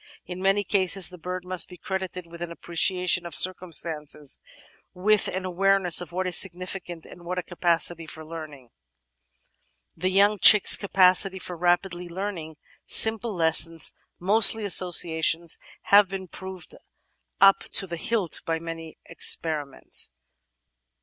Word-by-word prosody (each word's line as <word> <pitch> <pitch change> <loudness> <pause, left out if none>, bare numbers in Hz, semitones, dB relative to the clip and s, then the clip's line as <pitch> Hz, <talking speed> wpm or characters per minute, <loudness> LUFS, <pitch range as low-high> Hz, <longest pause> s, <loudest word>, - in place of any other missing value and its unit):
In 180 0 -9
many 195 +2 +1
cases 195 -1 0
the 180 -1 -13
bird 180 +2 -7
must 185 -1 +1
be 180 - -13
credited 190 -1 -6
with 170 0 -14
an 175 -1 -6
appreciation 180 +1 -1
of 170 - -10
circumstances, 160 -5 0 0.6
with 205 +3 +1
an 185 0 -5
awareness 185 -1 +1
of 175 - -9
what 185 +2 -4
is 180 -2 +1
significant, 180 -2 -1
and 175 - -15
with 180 +1 -6
a 180 - -3
capacity 170 -1 -2
for 160 0 -9
learning. 155 -6 -11 1.3
The 185 - -2
young 200 +2 +2
chick's 210 +2 +7
capacity 190 -1 +2
for 180 -1 -7
rapidly 175 +1 -2
learning 175 -4 -7 0.3
simple 220 -1 +4
lessons, 165 -1 +2 0.2
mostly 215 +3 +4
associations, 170 -3 +1 0.2
has 200 0 +4
been 190 0 -8
proved 185 0 -10 0.7
up 195 +1 +5
to - - +4
the 170 -2 -7
hilt 200 0 -2
by 165 0 -3
many 165 -1 -10
experiments. 145 - +1
180 Hz, 135 wpm, -24 LUFS, 165-190 Hz, 1.3 s, chick's